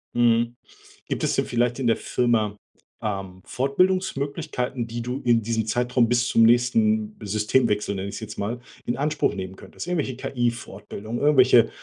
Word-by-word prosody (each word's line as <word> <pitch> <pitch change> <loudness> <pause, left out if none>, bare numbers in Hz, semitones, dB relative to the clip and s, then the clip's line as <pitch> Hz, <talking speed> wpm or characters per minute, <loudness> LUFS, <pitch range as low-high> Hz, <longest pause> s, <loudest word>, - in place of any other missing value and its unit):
Mm. 120 0 +3 0.5
Gibt - - -3
es - - +1
denn - - +1
vielleicht 120 +1 0
in 125 - 0
der 115 - +3
Firma, 110 -4 0 0.4
ähm, 95 -3 -4
Fortbildungsmöglichkeiten, 140 -4 -1
die 120 +1 -5
du 125 +4 -4
in 120 -1 +3
diesem 110 -1 -1
Zeitraum 120 +1 +1
bis 120 +1 +2
zum 115 - +4
nächsten 210 - +3
Systemwechsel 105 0 +1
nenne 95 0 -4
ich - - -7
es - - -5
jetzt 110 -1 -7
mal, 115 +4 -2 0.3
in 120 - -2
Anspruch 150 +2 0
nehmen 95 -1 -6
könntest? - - -9
Irgendwelche 150 -7 -1
KI-Fortbildungen, 120 -3 -4
irgendwelche 130 -5 +5
120 Hz, 155 wpm, -24 LUFS, 110-130 Hz, 0.5 s, irgendwelche